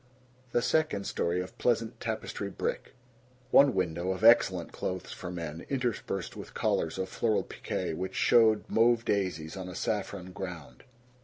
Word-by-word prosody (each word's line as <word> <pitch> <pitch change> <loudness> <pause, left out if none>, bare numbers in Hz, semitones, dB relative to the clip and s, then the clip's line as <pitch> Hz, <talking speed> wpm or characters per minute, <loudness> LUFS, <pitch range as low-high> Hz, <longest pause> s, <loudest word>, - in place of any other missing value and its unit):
The 120 - +1
second 140 -9 +1
story 85 +1 0
of 90 - -8
pleasant 115 -1 0
tapestry 110 -3 -4
brick. - - -4 0.6
One 140 -5 +6
window 90 -1 -1
of 95 - -7
excellent 95 -7 +5
clothes 95 -1 -4
for 90 - -7
men, 85 -2 -5
interspersed 120 - -2
with - - -9
collars 80 +2 0
of 95 0 -2
floral 110 +3 0
pique 80 - -4
which 95 +3 -4
showed 110 -2 +4
mauve 115 +1 +3
daisies 90 -6 -1
on 95 -1 -6
a 90 - -8
saffron 100 -4 -3
ground. 85 -9 -8
95 Hz, 150 wpm, -30 LUFS, 90-115 Hz, 0.6 s, One